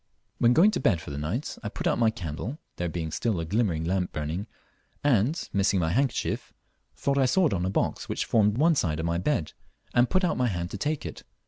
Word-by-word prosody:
When 120 +1 +5
going 185 +10 +6
to - - -1
bed 100 -9 +2
for 80 - -8
the 70 - -5
night, 90 - -3
I 105 - -4
put - - -6
out - - +2
my 115 -2 +5
candle, 95 - -5 0.2
there 90 -1 -1
being 80 -1 -4
still 110 +1 -1
a 85 - -2
glimmering 95 -4 0
lamp 90 +1 0
burning, 80 +8 -3 0.6
and, 140 - +2
missing 100 -1 +2
my 80 -2 +1
handkerchief, 130 +6 0 0.4
thought 140 0 0
I 130 - +4
saw 180 +9 +3
it 155 - +2
on 90 -2 0
a - - 0
box - - -1
which - - -1
formed 105 -1 +3
one 165 +4 +4
side 80 - 0
of 80 - -2
my 85 0 0
bed, 90 - -1 0.4
and 120 0 +4
put 185 0 +2
out 180 - +1
my 125 - +2
hand 90 -4 -3
to - - -4
take 150 +4 -1
it. - - -6
105 Hz, 235 wpm, -27 LUFS, 85-130 Hz, 0.6 s, going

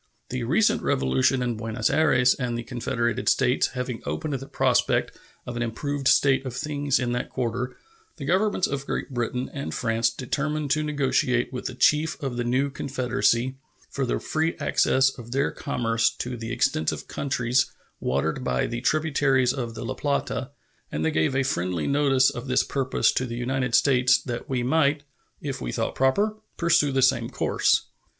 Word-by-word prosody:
The 125 0 -3
recent 205 - +2
revolution 125 - +1
in 120 -1 -1
Buenos 115 0 -1
Ayres 125 -5 +4
and 120 -2 -3
the 120 - -4
Confederated 120 0 -1
States 125 -1 +2
having 125 -2 -4
opened 80 - -3
the 135 0 -4
prospect 130 -2 +1 0.3
of 120 - -6
an 120 - -3
improved 135 +4 -2
state 135 -1 +4
of 130 -2 -6
things 145 0 0
in 125 -2 -1
that 125 0 -2
quarter, 125 0 -3 0.4
the 140 - -6
Governments 185 +4 +2
of 140 0 -4
Great - - -3
Britain 125 +1 -2
and 140 -2 -4
France 115 -1 +1
determined 145 +4 -2
to 155 - +2
negotiate 130 -4 0
with 125 - -5
the 130 -2 -4
chief 150 +4 +2
of 135 -3 -2
the 120 - -1
new 130 +4 +1
confederacy 130 -1 0 0.3
for 140 - -2
the - - 0
free 160 +1 -1
access 135 0 +3
of 120 0 -8
their 140 +2 +1
commerce 115 -1 0
to 125 0 -5
the 115 0 -6
extensive 125 -10 0
countries 130 -2 0 0.3
watered 70 +5 -1
by 65 - 0
the 120 0 -4
tributaries 135 -4 +2
of 120 -4 -4
the - - -6
La 130 - -2
Plata; 140 +1 -2 0.4
and 75 +1 -2
they 80 - +2
gave 80 +11 +1
a 135 - +2
friendly 90 - -1
notice 140 -2 +3
of 120 +3 -7
this 125 0 +3
purpose 135 -2 +1
to 130 - -1
the 120 0 -5
United 125 0 0
States, 130 -2 +4
that 120 -1 -6
we 125 -2 0
might, 145 +2 +2 0.4
if - - -4
we - - -3
thought - - -2
proper, 200 +12 +1 0.2
pursue 170 -4 +3
the 135 -1 +2
same 130 - +3
course. - - +1
130 Hz, 175 wpm, -25 LUFS, 120-140 Hz, 0.4 s, Ayres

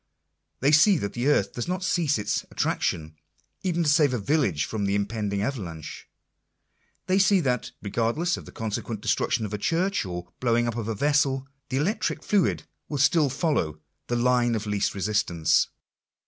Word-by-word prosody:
They 140 +3 +4
see 170 +5 +6
that 100 -8 -3
the 120 +3 -1
earth 145 - +2
does 120 - -4
not 185 +1 -2
cease 170 -7 +1
its 105 - -1
attraction, 80 0 -1 0.5
even 175 -3 0
to 155 - +2
save 145 -4 +4
a - - 0
village 105 - +1
from 105 -2 -3
the 100 0 +1
impend 105 0 -2
ing 100 0 -1
avalanche. 85 - -5 1.0
They 185 +1 +2
see 195 0 +5
that, 125 -5 -1
regardless 115 - 0
of - - -9
the - - -10
consequent 110 0 -4
destruction 110 +1 0
of 105 - -6
a 105 - -2
church, 180 - 0
or 90 -2 -7
blowing 120 -1 +2
up 115 - -2
of 115 -2 -3
a 115 - -2
vessel, 135 +1 +1 0.2
the 130 - -1
electric 185 - -1
fluid 200 -4 +1 0.3
will 145 - -2
still 145 +1 +4
follow 130 - -1
" - - -52
the 120 - -1
line 120 -1 +2
of 110 0 -3
least 105 -1 -1
resistance." 95 -6 +2
120 Hz, 180 wpm, -26 LUFS, 105-150 Hz, 1.0 s, see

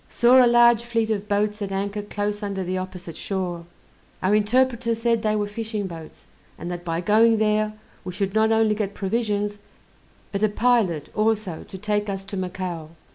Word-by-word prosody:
Saw 250 +2 +6
a - - +5
large 240 -1 +5
fleet 230 -2 -1
of 210 -1 -2
boats 210 +1 0
at 200 -1 -3
anchor 200 +2 -2
close 205 0 -3
under 200 -2 -3
the 185 +1 -3
opposite 180 -3 -7
shore. 180 -3 -3 0.6
Our 190 +2 +3
interpreter 235 +2 +2
said 230 0 +1
they 215 0 +1
were 205 -1 0
fishing 215 -1 -4
boats, 165 -4 -10 0.3
and 175 - -6
that 175 0 -5
by 165 -1 -2
going 220 +4 +4
there 215 0 +1 0.3
we 185 - -5
should 195 +1 -2
not 220 +1 +3
only 220 -1 +3
get 205 -1 -3
provisions, 205 0 -1 0.7
but 200 - -2
a 215 - +3
pilot 210 - +1
also 215 -5 0
to 190 - -9
take 210 +1 -1
us 195 -1 -4
to 195 - -7
Macao. 180 -4 -4
210 Hz, 185 wpm, -23 LUFS, 190-220 Hz, 0.7 s, Saw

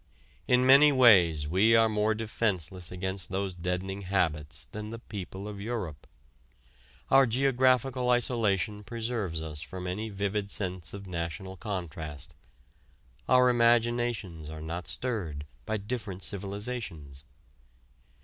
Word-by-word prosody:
In 125 0 +4
many 140 +3 +8
ways 90 - +5
we 100 +8 +4
are 115 0 +6
more 110 0 +1
defenceless 95 -6 -2
against 95 -1 -1
these 95 0 -2
deadening 90 +2 -3
habits 85 -5 -1
than 105 0 -6
the 115 - -6
people 100 -3 -7
of 100 -1 -7
Europe. 100 -9 -5 1.0
Our 135 -1 +7
geographical 130 0 +2
isolation 105 -5 +1
preserves 110 -7 -3
us 75 -2 -4
from 90 +3 -7
any 105 +5 -3
vivid 100 0 -2
sense 95 -3 -3
of 100 0 -8
national 90 +2 -5
contrast: 80 -7 -5 1.0
our 125 0 +6
imaginations 115 -8 +1
are 80 0 -7
not 85 +3 -5
stirred 90 - -2 0.2
by 110 0 0
different 105 -3 -5
civilizations. 100 - -5
100 Hz, 120 wpm, -29 LUFS, 90-115 Hz, 1.0 s, many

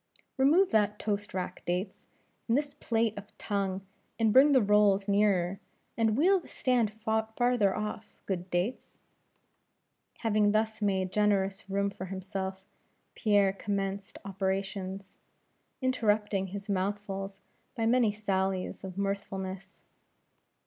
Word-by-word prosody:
"Remove 315 +9 +4
that 210 -1 +2
toast 205 -1 -2
rack, 180 -1 -4
Dates; 180 +3 -3 0.4
and 230 +2 +3
this 290 0 -2
plate 230 -5 0
of 205 +1 -15
tongue, 195 -2 -2 0.3
and 220 -2 +2
bring 275 +3 +7
the 270 - +6
rolls 205 -1 +4
nearer, 195 -2 +2 0.4
and 225 -1 +2
wheel 375 +6 +5
the - - -15
stand 245 -5 +1
farther 220 0 +1
off, 215 0 -5
good 185 -2 -3
Dates." 180 +8 -2 1.2
Having 210 -2 +3
thus 220 0 0
made 190 -2 0
generous 200 -2 +1
room 200 +1 0
for 190 - -7
himself, 190 0 -5 0.5
Pierre 205 -3 +3
commenced 195 0 -3
operations, 195 0 -3 0.6
interrupting 210 -6 +1
his 200 +2 -7
mouthfuls 195 0 -3 0.4
by 225 -3 -1
many 235 -2 +4
sallies 190 -3 -2
of 190 -1 -7
mirthfulness. 195 -1 -4
200 Hz, 120 wpm, -30 LUFS, 195-220 Hz, 1.2 s, bring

